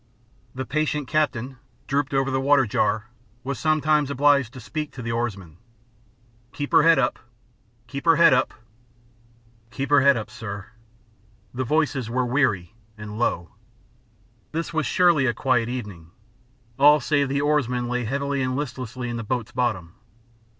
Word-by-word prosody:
The 130 +1 -4
patient 150 -1 -1
captain, 135 -4 -1 0.3
drooped 140 0 -1
over 135 0 0
the 130 0 0
water 140 -1 +4
jar, 105 +2 -1 0.3
was 140 +2 -4
sometimes 155 -2 +2
obliged 140 -3 +3
to 130 - -9
speak 150 +6 -5
to 125 - -8
the 115 - -3
oarsman. 100 -8 -4 1.0
"Keep 145 -1 -5
her - - +6
head 165 0 +5
up! 130 -2 0 0.7
Keep 140 +5 -7
her 165 -1 +6
head 165 -3 +6
up!" 125 - +2 1.2
"'Keep 135 +3 -5
her 145 -2 +6
head 140 -1 +5
up,' 110 0 -6
sir." 100 -4 -7 0.8
The 130 +1 -3
voices 140 -3 0
were 125 +2 0
weary 120 - 0 0.2
and 105 0 -8
low. 85 -7 -1 1.0
This 165 +1 -3
was 160 -5 0
surely 170 -6 +3
a 120 - 0
quiet 120 -3 +1
evening. 105 -10 -7 0.7
All 145 +2 +7
save 145 -2 +1
the 140 +1 0
oarsman 130 -5 0
lay 125 0 -2
heavily 140 +3 -2
and 130 0 -1
listlessly 125 -3 -5
in 120 0 -4
the 115 - -4
boat's 120 0 -3
bottom. 105 -10 -2
130 Hz, 155 wpm, -24 LUFS, 115-145 Hz, 1.2 s, All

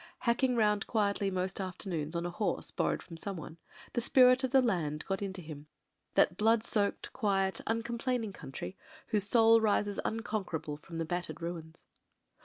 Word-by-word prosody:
Hacking 250 +1 +2
round 210 -3 +2
quietly 200 -2 +1
most 185 +1 -2
afternoons 175 -4 -4
on 170 0 -1
a 175 - -2
horse 175 0 -2
borrowed - - -1
from 165 - -10
someone, 170 -3 -6 0.3
the 240 - 0
spirit 255 +1 +5
of 260 - +1
the 265 +1 +5
land 170 - 0
got 195 0 -2
into 190 -2 -4
him, 150 -1 -9 0.5
that - - +4
blood 220 +1 +3
soaked, 205 -3 -1
quiet, 195 -2 +1
uncomplaining 230 -1 -1
country, 135 +4 -7 0.3
whose 210 -3 +2
soul 225 +1 +6
rises 205 -1 +1
unconquerable 205 -9 -3
from 165 +3 -9
the 165 - -1
battered 170 -2 -3
ruins. 165 -1 -6
200 Hz, 160 wpm, -32 LUFS, 170-225 Hz, 0.5 s, soul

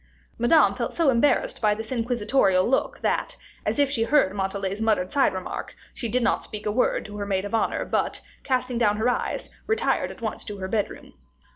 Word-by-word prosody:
Madame 240 +7 +5
felt - - -3
so 325 -5 +4
embarrassed 290 - +2
by 210 -2 +3
this 220 +2 -7
inquisitorial 230 -5 +2
look, 265 - 0
that, - - -1 0.3
as - - 0
if 285 -1 +4
she 245 -5 0
heard 250 -7 +3
Montalais's 195 +1 -2
muttered 215 -5 +1
side 280 - +3
remark, 185 -1 -6 0.2
she 235 - -4
did 250 +2 +1
not - - +1
speak 210 -1 -7
a 210 - +1
word 250 +4 +1
to 205 -1 -8
her 205 - -3
maid 195 -1 0
of 205 - -6
honor, 225 - 0
but, - - -1 0.2
casting 255 -2 0
down 210 -3 +3
her 225 +3 +2
eyes, 245 - -2 0.2
retired 440 - +1
at - - -10
once 225 -3 -4
to 205 - -6
her 190 -1 -4
bedroom. 205 +1 -3
225 Hz, 205 wpm, -25 LUFS, 205-255 Hz, 0.3 s, Madame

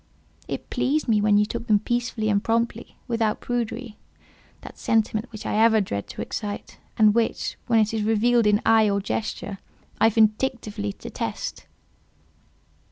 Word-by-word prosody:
"It - - -6
pleased 300 +3 0
me 215 -3 +3
when 205 0 +4
you 210 - +4
took 235 +2 -5
them 215 -3 +5
peacefully 235 0 -2
and 200 0 +1
promptly, 230 0 -1
without 225 -2 0
prudery—that 235 -2 -7
sentiment 220 +1 0
which 215 - -9
I - - -1
ever 225 -1 +5
dread 100 - -3
to - - -5
excite, 205 -2 -6 0.2
and 215 -1 +6
which, 230 0 0
when 230 - +3
it 215 0 +2
is 220 - 0
revealed 225 +2 +3
in 210 0 +3
eye 220 -1 +5
or 200 0 +1
gesture, 200 -1 -4 0.4
I 225 - +6
vindictively 215 - 0
detest. - - -5
220 Hz, 150 wpm, -24 LUFS, 210-235 Hz, 0.4 s, and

